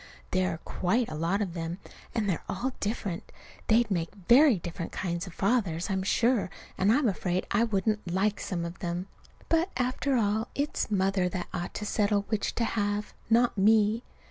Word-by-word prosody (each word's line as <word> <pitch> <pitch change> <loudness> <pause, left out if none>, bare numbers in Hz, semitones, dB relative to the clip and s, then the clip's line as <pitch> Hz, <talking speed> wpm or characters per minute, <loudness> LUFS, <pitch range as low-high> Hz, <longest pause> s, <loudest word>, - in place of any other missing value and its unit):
There 185 0 +2
are - - -8
quite 225 +7 0
a - - -4
lot 170 +7 0
of 180 -4 -5
them, 165 0 -4 0.4
and 220 -3 +1
they're 180 -5 0
all 260 +1 -2
different. 200 -4 -3 0.4
They'd 225 0 +3
make 170 -3 0
very 240 - +5
different 170 0 -6
kinds 175 0 -3
of 180 - -9
fathers, 195 -5 0
I'm 190 0 0
sure, 230 +2 +2 0.3
and 195 +3 +3
I'm 265 +2 +3
afraid 185 -2 -1
I 220 +3 +3
wouldn't 210 -2 0
like 200 +3 +1
some 170 -3 -3
of 170 +1 -7
them. 175 +1 -3 0.4
But, 330 +3 +2
after 255 +2 0
all, 220 0 +1
it's 285 -2 -1
Mother 190 -2 +1
that 180 0 -4
ought 175 -1 -4
to 210 - -4
settle 205 -1 +1
which 215 -2 -1
to 235 - +1
have 205 -1 -1 0.2
not 230 -2 +3
me. 215 +2 +4
205 Hz, 180 wpm, -29 LUFS, 180-225 Hz, 0.4 s, very